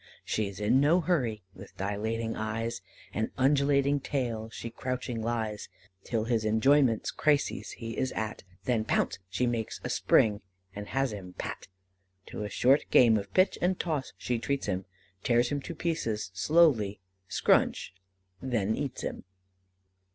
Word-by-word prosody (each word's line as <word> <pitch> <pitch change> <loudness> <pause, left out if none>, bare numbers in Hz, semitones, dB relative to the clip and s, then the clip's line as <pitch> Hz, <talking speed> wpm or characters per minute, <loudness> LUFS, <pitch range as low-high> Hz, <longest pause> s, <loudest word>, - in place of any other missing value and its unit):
She's 100 -2 -2
in 105 +5 +3
no 155 +6 +4
hurry. 125 - 0
With 95 +1 -13
dilating 110 +3 -2
eyes, 110 0 -3 0.3
And 110 +1 -1
undulating 140 +1 +3
tail, 120 -6 -2
she 115 0 -7
crouching 125 -1 -3
lies, 110 -2 -2 0.3
Till 115 -2 -1
his 115 -1 0
enjoyments 115 +2 +3
crises 145 -2 0
he 115 -1 -6
is 130 - 0
at, 110 -1 -3 0.2
Then 115 0 +1
pounce! 110 - 0
she 100 +7 0
makes 115 -2 -2
a - - -3
spring, 105 -1 +3 0.3
and 105 0 -6
has 135 -4 0
him 95 -3 -8
pat. - - -5 0.6
To - - -5
a 105 - -4
short 130 +8 +3
game 115 -3 +6
of 100 -2 -3
pitch 185 +1 +3
and 180 +1 +1
toss 155 -6 -2
she 120 -2 -2
treats 140 +3 -2
him 95 -2 -2 0.4
Tears 120 +1 +2
him 145 -1 -2
to 170 - -7
pieces 115 - -2
slowly 110 - +3 0.3
SCRUNCH - - +2 0.5
then 110 -5 0
eats 140 -4 -4
him." - - -4
115 Hz, 150 wpm, -29 LUFS, 110-135 Hz, 0.6 s, game